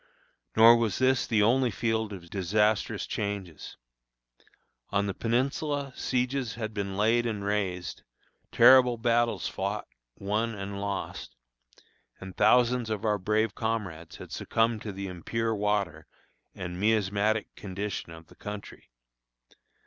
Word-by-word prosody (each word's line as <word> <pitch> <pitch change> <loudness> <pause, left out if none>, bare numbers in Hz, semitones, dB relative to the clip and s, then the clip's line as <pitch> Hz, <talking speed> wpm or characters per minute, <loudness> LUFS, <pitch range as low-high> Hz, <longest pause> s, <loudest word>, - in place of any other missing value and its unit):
Nor 115 +1 +8
was 115 -4 0
this 130 0 +2
the 110 -3 +3
only 125 +3 +3
field 110 0 -1
of 85 -4 -10
disastrous 105 +3 +1
changes. 100 -6 -5 1.1
On 100 0 +1
the 100 - -2
Peninsula 135 +5 -1
sieges 125 -2 -1
had 110 -2 -4
been 100 -2 -3
laid 115 +3 +2
and 105 -3 -3
raised, 95 -4 -2 0.5
terrible 125 0 +7
battles 120 0 +1
fought, - - -3 0.3
won, 110 +3 -1
and 100 0 -5
lost, 100 -1 -5 0.8
and 95 -1 -9
thousands 120 +2 +3
of 110 -1 -3
our 105 -1 +1
brave 105 +2 +1
comrades 100 -9 -4
had - - -11
succumbed 115 -1 0
to 105 - -5
the 100 0 -6
impure 110 +5 -2
water 100 -7 -1 0.5
and 90 -1 -6
miasmatic 105 0 +1
condition 100 -2 -5
of 80 0 -11
the - - -19
country. 105 0 -9
105 Hz, 125 wpm, -28 LUFS, 100-115 Hz, 1.1 s, Nor